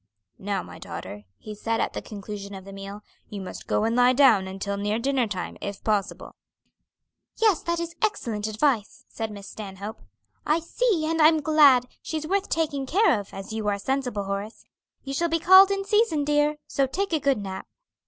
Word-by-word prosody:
"Now 195 -1 -2
my - - -11
daughter," 105 +1 -8
he 215 - -9
said, 225 +2 -2
at - - -1
the - - -4
conclusion 200 -1 -8
of 190 -1 -10
the 195 - -10
meal, 195 +1 -8 0.3
"you 205 - -6
must 190 -1 -8
go - - +1
and 225 +1 +1
lie 250 +1 +5
down 240 -8 +5
until 195 +1 -4
near 205 +2 -1
dinner 260 0 +1
time, 185 -4 -5
if 200 -1 -6
possible." 205 -2 -2 1.0
"Yes, 430 -7 +3
that 340 0 -1
is 340 0 -4
excellent 230 - -1
advice," 220 0 0
said 225 -1 -4
Miss 200 -1 -9
Stanhope. 205 +1 -8 0.4
"I 305 +2 +2
see, 340 0 0
and 325 +1 0
I'm 315 +1 +6
glad, 285 -5 +5 0.2
she's 310 -1 -4
worth 390 +4 -1
taking 290 -4 -1
care 360 - +3
of, 200 - -9
as 195 +2 -8
you 220 -1 -3
are 205 -1 +1
sensible, 250 -1 -2
Horace. 200 +3 -5 0.4
You 275 - -5
shall 340 +4 0
be 330 - +2
called 375 +4 +8
in 395 0 -1
season, 415 -7 +2
dear. 295 +1 +2
So 275 -1 0
take 380 +7 -2
a 315 - +2
good 280 -2 +2
nap." 190 -2 -6
245 Hz, 195 wpm, -25 LUFS, 205-315 Hz, 1.0 s, called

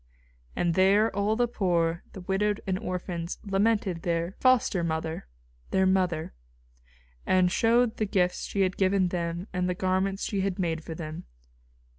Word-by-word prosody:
And 175 -1 +1
there 200 +5 +3
all 205 +2 +1
the 240 +1 +2
poor, 170 -6 0
the 190 - -8
widowed 200 +3 0
and 190 -1 -1
orphans 180 -4 -4
lamented 200 -3 +1
"their 170 0 -1
foster 250 -8 +3
mother," 160 - -3 0.4
"their 190 0 +2
mother," 185 -4 +1 0.9
and 185 -1 +3
showed 235 +3 +2
the 215 - 0
gifts 180 -2 0
she 200 - -2
had 185 -1 +1
given 190 -1 +2
them 175 +1 -3
and 180 0 0
the 180 - -1
garments 190 +2 0
she 200 -2 -1
had 190 -1 -1
made 165 -4 -1
for 160 - -7
them. 155 -1 -7
185 Hz, 155 wpm, -27 LUFS, 170-200 Hz, 0.9 s, there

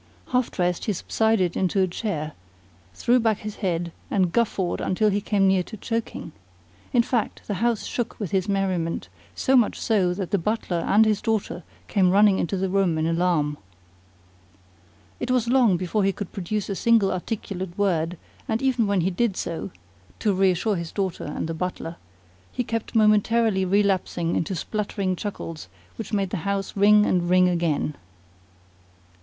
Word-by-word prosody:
Half 250 -1 +1
dressed, 180 -1 -1
he 210 - 0
subsided 195 -2 +1
into 190 +1 +1
a 190 - +3
chair, 170 -5 -3 0.6
threw 245 - +3
back 225 -3 +2
his 210 -1 -6
head, 175 -4 -1 0.2
and 185 -4 +1
guffawed 195 -4 0
until 210 +3 +1
he 205 +1 0
came 200 -1 +2
near 190 -1 +3
to 215 +5 -8
choking. 225 -6 -4 0.6
In 240 -2 +4
fact, 235 -2 -2
the 205 - -3
house 235 -2 +1
shook 240 -2 -3
with 200 -7 -4
his 190 +1 0
merriment, 185 -4 -1 0.3
so 265 - +2
much 240 -5 +3
so 195 -6 +2
that 190 -2 -4
the 200 - +2
butler 200 -1 -1
and 215 +2 +5
his 215 -2 +1
daughter 220 -5 -1 0.3
came 190 -3 +3
running 200 +1 +5
into 190 +3 -1
the 190 +1 0
room 185 -3 +1
in 155 - 0
alarm. 165 -3 +1 1.6
It 245 - -3
was 250 -2 +2
long 240 -7 +4
before 185 +4 -1
he 195 - +3
could 200 -1 -7
produce 205 +1 -3
a 200 - -2
single 225 -2 +3
articulate 185 -2 -4
word; 175 -4 0 0.3
and 220 0 0
even 255 -4 +1
when 200 -2 +2
he 185 +3 +1
did 195 +1 0
so 165 - -4 0.5
(to 210 -3 +1
reassure 190 +2 +2
his 170 -1 -5
daughter 190 -4 -3
and - - -4
the 165 - -3
butler) 170 -1 -4 0.5
he 250 - -2
kept 230 0 -4
momentarily 215 -1 +3
relapsing 185 -3 +1
into 185 +3 -1
spluttering 200 +1 -2
chuckles 165 - -6 0.3
which 225 - -6
made 195 -3 0
the - - -1
house 195 +3 -3
ring 210 +1 +6
and 175 -1 +1
ring 180 0 +5
again. 170 -4 0
195 Hz, 170 wpm, -24 LUFS, 180-215 Hz, 1.6 s, ring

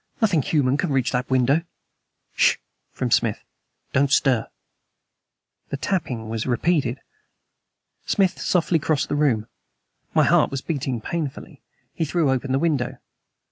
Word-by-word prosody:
"Nothing 200 -9 +3
human 135 -1 +1
can 175 - -1
reach 130 -3 +1
that 125 0 -1
window!" 130 +2 +3
"S 165 - -4 0.7
sh!" - - +4 0.4
from - - -3
Smith. - - +1 0.5
"Don't 140 +1 +2
stir." 130 -6 +3 1.2
The 140 - -3
tapping 135 - -2
was 110 +1 -3
repeated. 130 -1 +1 1.1
Smith 195 -3 +1
softly 170 -2 +2
crossed 155 -1 0
the - - 0
room. 130 -8 +2 0.7
My - - +5
heart - - +4
was 135 -1 -4
beating 135 -7 -3
painfully. 155 +1 -5 0.3
He - - -2
threw 155 -2 +1
open 130 +1 -1
the 135 - +3
window. 145 -5 0
140 Hz, 140 wpm, -23 LUFS, 125-160 Hz, 1.2 s, My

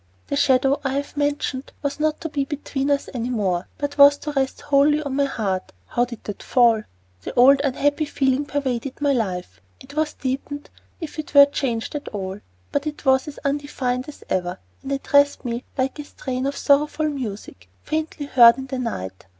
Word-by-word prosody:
The - - 0
shadow 270 -1 +3
I 270 -1 -1
have 285 +1 -3
mentioned 285 -2 -1
that - - -22
was 285 +1 -2
not 310 0 0
to 325 - -3
be 285 -2 -1
between 275 0 -3
us 285 -1 +1
any 245 -1 -3
more, 190 -7 -1
but 285 0 -4
was 285 0 +8
to 300 - -5
rest 270 -2 -1
wholly 290 +1 +3
on 280 -2 -3
my 280 0 +3
heart 195 -8 -3 0.2
how 240 - +1
did 235 -3 -10
that 205 - -6
fall? 235 -3 +4 0.4
The - - -7
old 270 +3 +7
unhappy 290 +2 +1
feeling 270 -1 0
pervaded 270 -3 -3
my 285 -1 +2
life. 180 - -3 0.2
It 260 +2 -13
was 310 -1 0
deepened, 275 +2 -4 0.3
if 320 -2 -7
it 300 - -7
were 280 0 +11
changed 255 -5 -2
at 295 -1 -5
all; 195 -1 -5 0.3
but 285 +1 -1
it 300 0 -6
was 265 +1 +3
as 295 - -8
undefined 275 -2 -2
as 295 - -12
ever, 180 -1 -1 0.2
and 275 - -6
addressed 285 0 +2
me 240 +1 -3
like 265 +3 -1
a - - -4
strain 260 -2 -4
of 280 0 -3
sorrowful 300 +2 +2
music 210 - -6
faintly 310 -1 -3
heard 240 -4 +7
in 265 - -5
the 265 -1 -4
night. 95 - -5
275 Hz, 195 wpm, -22 LUFS, 245-285 Hz, 0.4 s, were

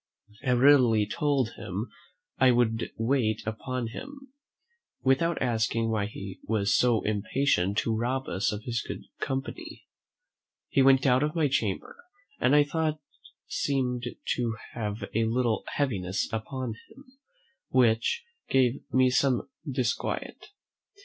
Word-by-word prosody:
I 125 -3 +2
readily 125 -4 +5
told 135 0 0
him 100 +6 -5 0.5
"I 130 - +6
would 120 -2 +2
wait 115 -2 +1
upon 115 +2 -3
him" 270 - -10 0.7
without 135 +6 +2
asking 115 -1 0
why 105 -2 0
he 100 -2 -8
was 105 -2 +1
so 120 -3 +3
impatient 105 -2 +1
to 115 - +1
rob 125 +4 -1
us 95 +3 0
of 105 0 -5
his 120 -1 -2
good - - -7 0.2
company. 160 - -5 0.8
He 135 - +3
went 135 0 +5
out 125 -1 +4
of 150 +2 -1
my 160 -3 +3
chamber, 110 -7 -2 0.4
and 130 +3 +4
I 145 - +7
thought 155 +1 -1 0.5
seemed 125 -3 -1 0.3
to 115 -2 -1 0.2
have 105 -2 -4
a 115 +1 +2
little 115 0 0
heaviness 100 -10 -1
upon 115 +2 -3 0.2
him, 270 -1 -18 0.5
which 120 - +2 0.3
gave 130 -1 +2
me 130 -1 +4
some 130 -1 +1 0.2
disquiet. 125 -3 -2
125 Hz, 130 wpm, -28 LUFS, 110-135 Hz, 0.8 s, I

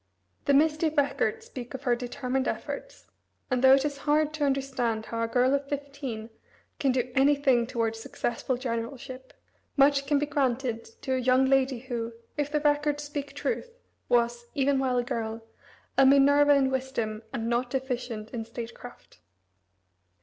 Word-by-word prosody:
The 280 - +4
misty 310 +2 +3
records 310 +9 0
speak 255 - -8
of 265 - -8
her 245 -3 +3
determined 250 +2 -2
efforts, - - -5 0.5
and 255 0 +1
though 265 0 +9
it 270 +1 0
is 285 -1 -3
hard 305 +1 +2
to 310 -1 -2
understand 265 -5 0
how 230 0 -4
a 230 - +1
girl 250 +3 +2
of 280 0 -1
fifteen 275 -6 -5 0.5
can 275 -3 +2
do 250 0 -1
any 275 +2 +5
thing 260 -5 +2
toward 230 -2 -1
successful 240 +2 -3
generalship, 255 +1 -5 0.5
much 275 0 +4
can 290 0 +3
be 290 - +1
granted 260 -5 -1 0.2
to 265 - -1
a 260 - +1
young 255 +1 +4
lady 270 -1 +2
who, 235 -3 -4 0.2
if 290 0 -2
the 300 0 +1
records 295 0 +1
speak 285 -1 -6
truth, 475 +8 -3 0.3
was, 240 0 +1
even 275 -1 +2
while 255 -2 +1
a 245 - +2
girl, 225 -1 -4 0.6
"a - - +8
Minerva 285 +1 +6
in 270 -1 +2
wisdom, 255 -5 -2
and 230 -4 -3
not 240 +1 0
deficient 245 -4 -3
in 235 -3 -4
statecraft." 230 +1 -10
265 Hz, 165 wpm, -28 LUFS, 240-285 Hz, 0.6 s, though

